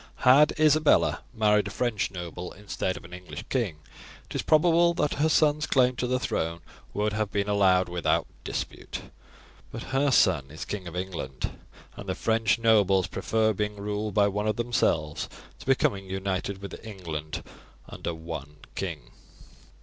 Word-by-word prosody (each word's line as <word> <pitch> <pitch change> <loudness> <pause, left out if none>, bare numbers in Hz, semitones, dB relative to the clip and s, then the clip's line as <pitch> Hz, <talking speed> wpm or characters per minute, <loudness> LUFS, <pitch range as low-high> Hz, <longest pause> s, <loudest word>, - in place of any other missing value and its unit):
Had 140 +4 +7
Isabella 155 0 +4
married 105 -3 +3
a - - -3
French 115 0 -1
noble 90 0 -6
instead 95 -2 -3
of - - -11
an 90 - -12
English 90 0 -8
king 110 - -1 0.5
it - - -10
is - - 0
probable 170 +2 +4
that 150 -2 +1
her 160 - +4
son's 150 -1 +3
claim 125 -2 +3
to 125 - -1
the 130 +1 +1
throne 85 -8 -2 0.3
would 105 +1 -1
have 110 -1 -1
been 100 0 0
allowed 95 -3 +4
without 90 -1 +1 0.2
dispute, - - -5 0.7
but - - -6
her 140 +2 +3
son 70 - +3
is 80 +3 -7
King 95 -4 -5
of 85 - -8
England, 90 -8 -4 0.4
and 100 - -8
the 95 - 0
French 110 -2 +2
nobles 100 -5 +4
prefer 110 -1 +1
being 105 +1 -2
ruled 105 0 -3
by 100 -1 +5
one 105 +1 -1
of 110 - +1
themselves 95 -10 0 0.3
to - - -13
becoming 100 -7 +1
united 95 +1 -3
with 100 - -8
England 80 -8 -5 0.4
under 85 - -5
one 80 -3 -7 0.2
king. - - -5
105 Hz, 160 wpm, -27 LUFS, 90-120 Hz, 0.7 s, Had